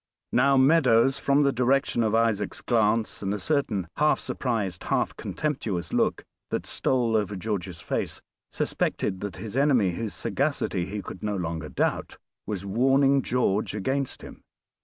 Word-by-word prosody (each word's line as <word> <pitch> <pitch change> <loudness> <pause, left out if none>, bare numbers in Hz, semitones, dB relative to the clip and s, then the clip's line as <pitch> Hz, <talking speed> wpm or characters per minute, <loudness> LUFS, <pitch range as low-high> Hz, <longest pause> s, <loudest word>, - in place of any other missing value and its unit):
Now 135 +2 +4
Meadows, 135 -3 +4
from 140 +1 +3
the 140 - +3
direction 130 0 +1
of 110 -1 +1
Isaac's 110 -3 0
glance, 110 -1 +1
and 100 0 -1
a - - -3
certain 105 - -1
half 150 +1 +3
surprised 105 -8 -3
half - - 0
contemptuous 105 - -3
look - - +1 0.3
that - - -2
stole 120 -4 +1
over 105 -2 0
George's 95 -3 -4
face, - - -3 0.3
suspected 95 - -1
that 100 0 -5
his 110 0 -7
enemy, 130 -9 +3
whose 100 +1 -4
sagacity 90 0 -1
he 100 0 -5
could 90 - -8
no 105 -1 -2
longer 80 -4 -4
doubt, - - -1 0.3
was 100 -2 -4
warning 135 +6 +3
George 110 -5 0
against 130 +6 -2
him. - - -11
115 Hz, 150 wpm, -26 LUFS, 100-135 Hz, 0.3 s, Now